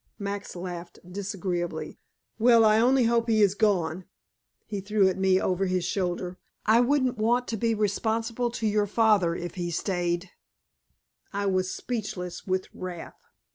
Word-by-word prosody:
Max 200 -1 -5
laughed 175 -1 -7
disagreeably. 180 -4 -4 0.4
"Well, 230 0 +6
I 215 0 +5
only 255 +2 +4
hope 230 0 +2
he 215 -1 +4
is 195 -2 +4
gone," 185 -5 +1 0.6
he 205 -2 -4
threw 200 0 +3
at 185 - -3
me 190 -1 +4
over 190 +1 0
his 185 -1 0
shoulder, 180 -1 -2 0.3
"I 220 +2 +5
wouldn't 255 -2 +2
want 240 +3 +2
to 230 - -1
be 230 +1 +1
responsible 225 +3 0
to 230 -1 -4
your 210 -1 +2
father 205 -5 +3
if 175 0 -5
he 180 -3 -4
had 170 -1 -3
stayed." 175 -1 -1 1.0
I 200 0 -2
was 185 -1 +1
speechless 195 -8 -5
with 185 0 0
wrath. 180 -2 -8
200 Hz, 155 wpm, -27 LUFS, 180-225 Hz, 1.0 s, Well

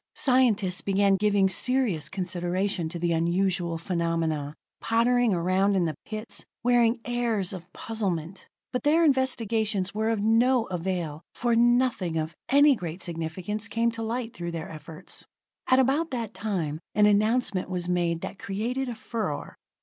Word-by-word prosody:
Scientists 230 -8 +2
began 195 0 +3
giving 205 -1 +3
serious 195 - +2
consideration 180 -1 -1
to 170 - -5
the 170 0 0
unusual 170 +1 +1
phenomenon, 165 -4 -1 0.2
pottering 240 +1 +2
around 185 +3 +2
in 180 -2 +2
the 160 - -1
pits, 215 +1 -5 0.2
wearing 240 -1 +3
airs 230 -6 -1
of 180 -2 -9
puzzlement. 190 -5 -4 0.3
But 250 - -1
their 315 +3 +3
investigations 225 -8 +1
were 220 +1 0
of 225 -2 0
no 230 +3 +3
avail, 175 -4 -3
for 240 -1 +1
nothing 240 -7 +2
of 160 0 -2 0.2
any 285 +1 +6
great 175 -3 -6
significance 175 +6 -4
came 235 +1 +1
to 230 0 -6
light 230 +1 -3
through 170 -3 -5
their 165 +3 -5
efforts. 160 +2 -7 0.4
At 255 - +5
about 275 +5 +2
that 230 -4 -4
time, 175 -8 -2 0.2
an 210 0 +5
announcement 210 -2 +2
was 180 -1 -2
made 170 -2 0
that 195 - -6
created 240 +7 -2
a 240 - -4
furor. 215 -8 -4
200 Hz, 150 wpm, -27 LUFS, 175-235 Hz, 0.4 s, any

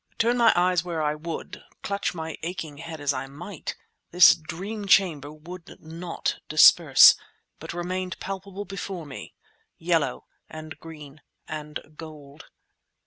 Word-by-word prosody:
Turn 235 +2 +2
my 235 -2 +5
eyes 180 -1 +2
where 170 -3 -3
I 150 0 +1
would, 160 +2 -7 0.2
clutch 200 -2 -2
my 160 -1 -5
aching 160 -4 -6
head 165 -1 -8
as 145 -1 0
I 130 0 -5
might, 160 +5 -8 0.3
this 180 0 +8
dream 195 +6 -7
chamber 160 -8 +3
would 165 +3 -12
not 165 +2 -5
disperse, - - +8 0.5
but - - -7
remained 185 +1 -4
palpable 195 +1 -6
before 195 -4 -6
me—yellow 160 +3 -4 0.2
and 155 0 -9
green 150 -3 -12 0.3
and 150 -1 -6 0.2
gold. 150 -2 -11
165 Hz, 130 wpm, -25 LUFS, 155-185 Hz, 0.5 s, this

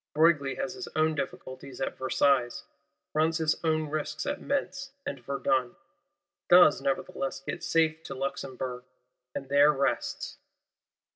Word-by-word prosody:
Broglie 150 -4 +4
has 180 - -3
his - - -7
own 155 0 +3
difficulties 130 -3 -6
at - - -2
Versailles, 130 -1 +2 0.5
runs 160 +1 +2
his 160 -2 +2
own 155 -1 +1
risks 155 +1 -3
at 290 0 -2
Metz 280 0 -2 0.2
and 285 - -4
Verdun; 135 -3 0 0.7
does 175 -5 +7
nevertheless 180 +5 -2
get - - -5
safe 160 -1 +2
to 135 - -6
Luxemburg, 130 -2 -4 0.5
and 135 - -4
there 145 +2 +6
rests. 140 -1 -2
150 Hz, 130 wpm, -29 LUFS, 135-160 Hz, 0.7 s, does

